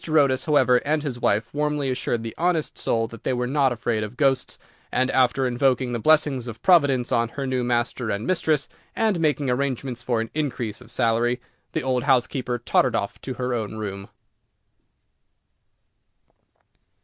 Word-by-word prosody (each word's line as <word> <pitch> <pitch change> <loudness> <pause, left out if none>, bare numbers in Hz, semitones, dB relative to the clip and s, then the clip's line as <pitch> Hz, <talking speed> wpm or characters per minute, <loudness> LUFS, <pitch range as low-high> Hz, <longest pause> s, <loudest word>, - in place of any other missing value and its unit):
Otis, 140 -4 +3
however, 130 -5 +4
and 150 +3 -1
his 130 -5 -4
wife 110 0 0
warmly 150 -2 0
assured 120 -2 -2
the 115 - -5
honest 170 -2 0
soul 115 -1 0
that 115 0 -12
they - - 0
were 125 0 -1
not 135 0 +2
afraid 115 -2 -1
of 105 +4 -7
ghosts, 135 -3 +1 0.3
and, 130 +1 +1
after 130 +1 +2
invoking 125 0 +1
the 120 - -2
blessings 140 -1 +3
of 115 -1 -7
Providence 145 -9 +4
on 115 0 +2
her 140 +3 -5
new 130 -1 -1
master 120 0 -1
and 100 +2 -2
mistress, 155 -5 +1 0.3
and 215 -6 +1
making 150 -3 +1
arrangements 130 -1 -2
for 120 -1 0
an 115 0 -4
increase 125 -8 -3
of 120 - -15
salary, 120 +1 +1 0.3
the - - -1
old 130 0 0
housekeeper 125 -2 +1
tottered 120 +1 +1
off 100 -3 -3
to 130 - -5
her 125 0 -2
own 110 -2 -3
room. 100 -2 -6
125 Hz, 165 wpm, -24 LUFS, 120-140 Hz, 0.3 s, however